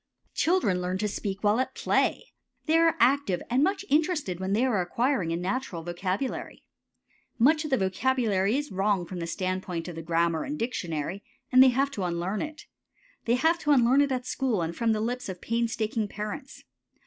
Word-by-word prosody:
Children 315 - +1
learn 180 +1 -2
to 210 +2 -1
speak 200 0 -4
while 210 +3 +3
at 260 - -2
play. - - 0 0.3
They 320 - +2
are 330 -1 +4
active 255 -7 +2
and 260 +3 +3
much 390 +3 0
interested 295 - +1
when 190 +1 -2
they 230 +5 +2
are 225 -8 +1
acquiring 230 - 0
a - - 0
natural 185 -1 -3
vocabulary. 185 +8 -3 0.7
Much 305 +6 +4
of 305 - -4
the 265 - +2
vocabulary 205 +1 +1
is 295 0 -4
wrong 195 -1 +1
from 180 +1 -7
the 170 - -4
standpoint 185 -1 -3
of 175 - -6
the 165 - -5
grammar 165 0 0
and 295 +2 -4
dictionary, 185 - -3 0.3
and 255 0 +7
they 260 - +8
have 270 +3 +1
to 205 -8 -4
unlearn 175 +3 -2
it. 310 -1 -6 0.6
They 235 - +3
have 320 +6 +2
to 300 - -3
unlearn 260 +1 +5
it 285 -1 +1
at 255 -1 -2
school 255 -8 -1
and 165 +1 -4
from 230 +3 +1
the 215 - -1
lips 245 0 -3
of 180 -1 -6
pains 230 +2 -1
taking 220 -1 -1
parents. 210 +6 -7
220 Hz, 195 wpm, -27 LUFS, 185-265 Hz, 0.7 s, they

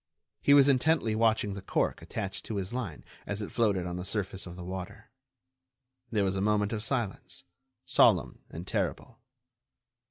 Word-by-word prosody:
He 140 - +6
was 140 -1 +7
intently 140 -3 +3
watching 110 -2 +2
the 100 - -6
cork 95 - 0
attached 95 -1 -5
to 110 - -4
his 95 +2 -3
line 105 - -4 0.2
as 105 0 -3
it - - -6
floated 100 -6 +1
on 90 0 -4
the 90 - -4
surface 95 -1 -3
of 85 - -8
the 90 - -8
water. 95 +2 -7 1.0
There 105 -3 +2
was 95 0 0
a 95 - -1
moment 105 +1 +2
of 105 - -2
silence—solemn 115 -3 0
and 85 +2 -7
terrible. - - -3
100 Hz, 160 wpm, -30 LUFS, 95-115 Hz, 1.0 s, was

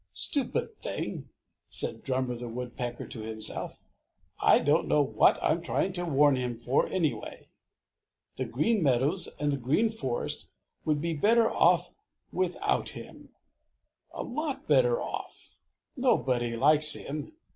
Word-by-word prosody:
"Stupid 285 - -1
thing!" - - -4 0.4
said - - -1
Drummer 130 -1 -1
the 120 0 -6
Woodpecker 120 0 -5
to 115 - -7
himself. 110 0 -4 0.6
"I - - +6
don't 150 +4 +2
know 150 - +4
what 140 - +3
I - - +3
am 165 - 0
trying 185 +2 -1
to 175 -1 -3
warn 145 -3 +4
him 125 -2 -3
for, 125 +3 +1
anyway. 165 -6 -3 0.9
The - - -1
Green 200 - +1
Meadows 140 +6 +2
and 145 0 +1
the 140 - -1
Green 155 - +1
Forest 130 - -3 0.4
would 150 -2 +1
be 170 +1 -1
better 225 +8 +3
off - - +3 0.4
without 185 -1 0
him, - - -11 0.8
a - - -5
lot 285 +2 -4
better - - +4
off! - - -7 0.4
Nobody 125 - +1
likes 150 +5 +5
him. 150 - -5
150 Hz, 135 wpm, -29 LUFS, 125-190 Hz, 0.9 s, I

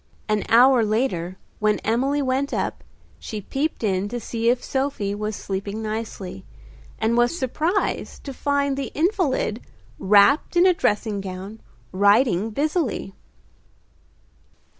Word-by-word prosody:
An 215 -1 0
hour 245 +1 +6
later 210 -5 -1 0.2
when 215 0 +2
Emily 270 +6 +1
went 265 +2 -1
up, - - -3 0.4
she 215 - -6
peeped 275 +7 -3
in 195 -1 0
to 240 +2 -4
see 230 0 -1
if 245 +1 +1
Sophie 265 -7 -2
was 210 +1 -3
sleeping 200 +3 -4
nicely, 215 -4 -5 0.5
and 225 +1 +1
was 240 +7 +2
surprised 320 - -1
to 275 - -6
find 280 0 0
the 275 -4 -4
invalid 310 - 0 0.4
wrapped 205 - +4
in 350 - +6
a 370 - +6
dressing 210 - 0
gown 195 +3 -7 0.3
writing 205 +1 +3
busily. 285 - -1
225 Hz, 125 wpm, -23 LUFS, 205-275 Hz, 0.5 s, hour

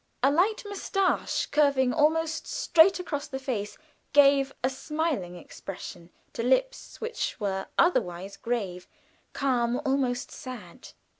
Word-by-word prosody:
A 275 - +5
light 390 +9 +2
mustache, 390 -1 0
curving 275 -4 +3
almost 320 +1 +1
straight 355 +3 +4
across 300 -4 -4
the 270 -2 -5
face, 240 -6 -4 0.4
gave 275 -1 +5
a 260 - +3
smiling 280 - -2
expression 175 -1 -9 0.2
to - - -3
lips 265 - 0
which 460 - -3
were 190 -2 -2
otherwise 190 - +1
grave, 200 -7 -3 0.5
calm, 245 -2 +1
almost 265 -2 0
sad. 235 -10 -10
270 Hz, 120 wpm, -27 LUFS, 230-320 Hz, 0.5 s, A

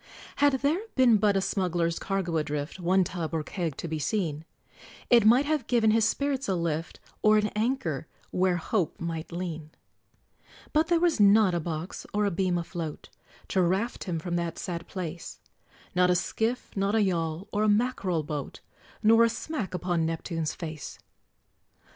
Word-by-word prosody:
Had 285 -1 +4
there 300 +6 +2 0.2
been 250 -4 +6
but 205 -1 +3
a - - +2
smuggler's 175 -4 0
cargo 190 -4 -1
adrift, 150 +2 -3
One 185 +2 +3
tub, 170 -2 -4
or 155 - -1
keg, 165 -3 -4
to - - -4
be 160 -1 -3
seen, 155 -2 -2 0.7
It 235 -3 +6
might 250 +6 +6
have 295 -5 -1
given 230 -3 +3
his 225 0 +3
spirits 275 +3 0
a 190 - +2
lift 165 -1 -2 0.2
Or 215 0 +5
an 210 0 +1
anker 210 - -1 0.2
where 185 -1 +2
Hope 175 -1 -1
might 165 -1 -4
lean! 165 -3 -5 1.0
But 315 +1 +3
there 340 -1 +3
was 340 -6 +2
not 205 -1 +6
a 175 - +1
box 165 +2 -5
or 210 0 +2
a 200 - +1
beam 180 0 0
afloat, 165 -2 -5 0.4
To 190 - +2
raft 190 +7 0
him 175 -3 -2
from 175 +2 -2
that 170 -1 -3
sad 170 -2 -5
place; 175 -3 -6 0.5
Not 180 0 +3
a 180 - +4
skiff, 225 +7 -2
not 200 +2 +1
a 220 - +4
yawl, 170 -1 -1
or 210 - 0
a 215 - +3
mackerel 205 -7 +1
boat, 145 -1 -5 0.4
Nor 225 +2 +6
a - - +2
smack 225 - -4
upon 175 -2 0
Neptune's 165 -1 -3
face. 155 -4 -7
185 Hz, 170 wpm, -28 LUFS, 165-215 Hz, 1.0 s, been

